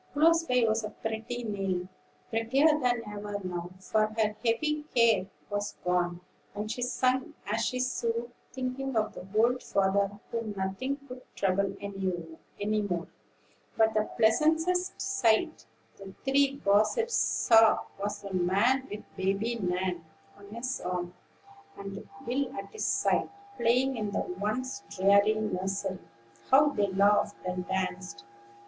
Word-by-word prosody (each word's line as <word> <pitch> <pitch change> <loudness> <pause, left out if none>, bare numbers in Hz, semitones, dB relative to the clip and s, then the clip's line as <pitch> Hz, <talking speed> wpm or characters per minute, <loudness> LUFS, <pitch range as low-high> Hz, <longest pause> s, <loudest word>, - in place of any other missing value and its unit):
Close 330 +3 +4
by 250 -5 +3
was 220 0 +1 0.2
pretty 225 +2 -3
Nell, 195 -4 -2 0.4
prettier 230 +6 +2
than 245 -3 +1
ever 205 0 -5
now; 175 -1 -4
for 215 +2 +1
her 215 -1 +1
heavy 300 +6 +1
care 230 -5 +4 0.2
was 205 0 -3
gone, 175 -1 0 0.3
and 210 +1 -3
she 245 - -4
sung 255 +1 0
as 215 +3 -1
she 255 - -1
sewed, 240 -1 -1 0.2
thinking 260 0 -3
of 215 -1 +1
the 180 - -9
old 245 +3 +3
father, 200 +1 +1
whom 230 -3 -3
nothing 195 +9 -2
could 250 0 -9
trouble 195 0 0
any 195 -2 -2 0.7
more. 175 -4 -2 0.7
But 220 0 +4
the 215 0 +1
pleasantest 320 +10 +2
sight 320 - +1 0.3
the 195 -1 -11
three 275 0 +3
gossips 215 - +3
saw 225 -2 +5 0.2
was 205 0 -3
the 200 -1 -7
man 200 +9 +2
with 205 - -6
Baby 200 +5 0
Nan 180 -2 -1 0.3
on 200 0 -15
his 240 +5 -4
arm 180 0 -3 0.6
and 200 0 -8 0.2
Will 255 +2 -1
at 195 0 -6
his - - -3
side, - - +1 0.3
playing 255 -1 +2
in 210 -2 -2
the 200 - -1
once 215 - -3
dreary 200 +3 +4
nursery. 195 -2 -2 0.5
How 290 +3 +6
they 205 -7 +1
laughed 200 +2 +3
and 180 0 -3
danced! 185 -10 -3
215 Hz, 135 wpm, -29 LUFS, 195-250 Hz, 0.7 s, How